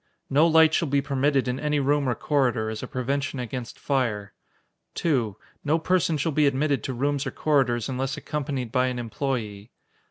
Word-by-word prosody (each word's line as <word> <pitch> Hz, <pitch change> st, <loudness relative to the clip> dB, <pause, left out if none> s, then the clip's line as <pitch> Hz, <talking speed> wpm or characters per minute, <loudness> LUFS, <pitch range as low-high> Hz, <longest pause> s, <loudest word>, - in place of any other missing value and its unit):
No 150 Hz, +5 st, +5 dB
light 160 Hz, -1 st, +5 dB
shall 165 Hz, -, +1 dB
be 140 Hz, 0 st, +2 dB
permitted 140 Hz, -1 st, +1 dB
in 125 Hz, +1 st, -1 dB
any 150 Hz, -1 st, 0 dB
room 140 Hz, 0 st, +1 dB
or 120 Hz, -, 0 dB
corridor, 125 Hz, -7 st, 0 dB
as 110 Hz, -, -5 dB
a -, -, -5 dB
prevention 140 Hz, +1 st, -2 dB
against 125 Hz, -1 st, -5 dB
fire. 115 Hz, -7 st, -1 dB, 0.6 s
2. 120 Hz, -, 0 dB, 0.3 s
No 150 Hz, +3 st, +2 dB
person 170 Hz, -1 st, +1 dB
shall 160 Hz, +3 st, 0 dB
be 150 Hz, 0 st, +3 dB
admitted 140 Hz, +1 st, +1 dB
to 130 Hz, -, -2 dB
rooms 140 Hz, +3 st, -1 dB
or -, -, -3 dB
corridors 130 Hz, -6 st, +1 dB
unless 135 Hz, +2 st, -2 dB
accompanied 140 Hz, -6 st, -3 dB
by 130 Hz, 0 st, +2 dB
an 125 Hz, -1 st, -2 dB
employee. 115 Hz, -3 st, -3 dB
135 Hz, 180 wpm, -25 LUFS, 125-145 Hz, 0.6 s, No